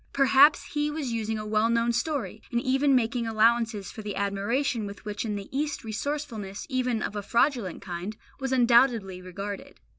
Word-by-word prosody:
Perhaps 275 +2 +6
He 295 0 0
was 295 -4 -3
using 220 -1 -2
a 215 - -5
well 215 +1 +2
known 235 0 +2
story, 245 -3 -2
and 235 - +1
even 270 +2 +2
making 235 -1 +1
allowances 225 -2 +2
for 220 - -8
the 205 -1 -5
admiration 205 +4 -1
with 200 +1 -10
which 210 +2 -3
in 210 -2 -2
the 200 -1 -6
East 295 +1 -1
resourcefulness, 225 -3 -4
even 250 -4 0
of 205 - -4
a 205 - -2
fraudulent 235 - 0
kind, 185 +4 -5 0.2
was 265 -1 -3
undoubtedly 235 -6 +3
regarded. 195 +2 -7
230 Hz, 175 wpm, -27 LUFS, 205-260 Hz, 0.2 s, Perhaps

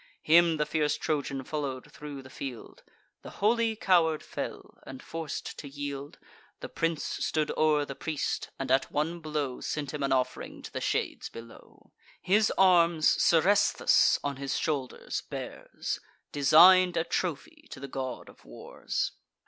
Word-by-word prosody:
Him 165 0 +5
the 150 - +1
fierce 150 -2 0
Trojan 140 -3 -2
follow'd 135 -3 -5
thro' 145 -2 -9
the 130 - -13
field: 130 -5 -8 0.4
The - - -10
holy 225 +2 +2
coward 170 -6 +2
fell; - - -7
and, 135 -1 -9
forc'd 165 0 -6
to 145 - -7
yield, 140 0 -6 0.4
The - - -7
prince 165 -2 -1
stood 155 -1 -1
o'er 150 -2 +2
the 140 - -6
priest, 155 +2 -3
and, 135 -1 -3
at 135 +1 +2
one 160 +4 -1
blow, 150 -5 -3
Sent 145 -2 -4
him 150 - -4
an 140 - 0
off'ring 130 -1 -2
to - - -9
the - - -4
shades - - -2
below. 115 0 -14 0.3
His 210 +4 +2
arms 170 -4 +5
Seresthus 185 +5 +4
on 140 -1 -3
his 135 0 -2
shoulders 140 -5 -3
bears, - - -5 0.3
Design'd 175 +5 +6
a 165 - +2
trophy 170 -4 -4
to - - -9
the 140 - -7
God 130 -2 -5
of - - -17
Wars. - - -4
150 Hz, 150 wpm, -29 LUFS, 135-165 Hz, 0.4 s, Design'd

